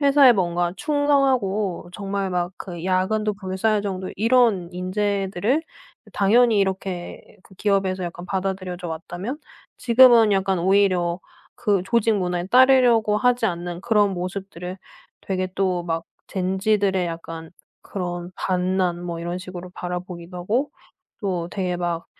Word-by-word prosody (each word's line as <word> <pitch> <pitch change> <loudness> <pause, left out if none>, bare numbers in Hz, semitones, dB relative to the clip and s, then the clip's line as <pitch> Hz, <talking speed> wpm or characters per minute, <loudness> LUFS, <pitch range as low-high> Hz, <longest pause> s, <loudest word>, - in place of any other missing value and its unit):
회사에 280 -3 +6
뭔가 175 -3 0
충성하고 265 - +1
정말 195 -1 -3
막 175 0 -1
그 175 -3 -8
야근도 205 +3 +1
불사할 200 +2 -1
정도의 190 -2 -4
이런 225 -5 +3
인재들을 200 - -1 0.5
당연히 220 +2 +4
이렇게 190 -2 -2 0.2
그 190 - -19
기업에서 195 -2 0
약간 175 +1 -7
받아들여져 185 -2 -3
왔다면, 175 - -5 0.4
지금은 235 -3 +6
약간 195 -1 +1
오히려 185 -2 +2 0.3
그 200 -3 +1
조직 230 0 +2
문화에 180 -1 -2
따르려고 245 -3 +5
하지 245 -1 +2
않는 175 0 -4
그런 205 -3 +2
모습들을 180 0 -6 0.4
되게 185 -1 -2
또 185 -2 0
막 165 -1 -3 0.2
젠지들의 190 0 +1
약간 165 -1 -7 0.3
그런 175 -2 -5
반란 180 -1 0
뭐 170 -1 -4
이런 175 +1 -3
식으로 185 -1 -8
바라보기도 180 0 -6
하고 230 +11 -1 0.5
또 180 -4 -2
되게 180 -2 -2
막 175 -1 -3
190 Hz, 290 characters per minute, -23 LUFS, 180-210 Hz, 0.5 s, 회사에